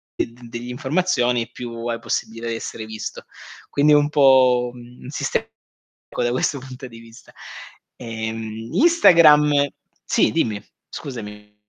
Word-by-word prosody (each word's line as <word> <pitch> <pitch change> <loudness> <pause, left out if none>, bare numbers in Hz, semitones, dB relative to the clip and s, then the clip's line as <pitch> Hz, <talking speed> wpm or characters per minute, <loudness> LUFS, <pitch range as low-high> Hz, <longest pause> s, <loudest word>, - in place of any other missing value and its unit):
delle 120 0 -6
informazioni 125 -3 0
è - - -32
più 115 -1 -7
possibile 115 0 -3
essere 115 -1 -6
visto. 110 0 -7 0.5
Quindi 150 +1 +4
è - - +7
un 145 0 +3
po', 130 -4 +4
un 120 0 -13
sistema - - -2
unico - - -12
da 120 - +1
questo 130 +2 0
punto 130 +1 -10
di 115 -2 -13
vista. 115 +1 -16 0.6
Ehm, 110 -1 -6
Instagram, 150 - +5 0.4
sì - - +2
dimmi, 105 -3 -1 0.3
scusami. 105 -5 -9
125 Hz, 125 wpm, -21 LUFS, 115-140 Hz, 0.6 s, è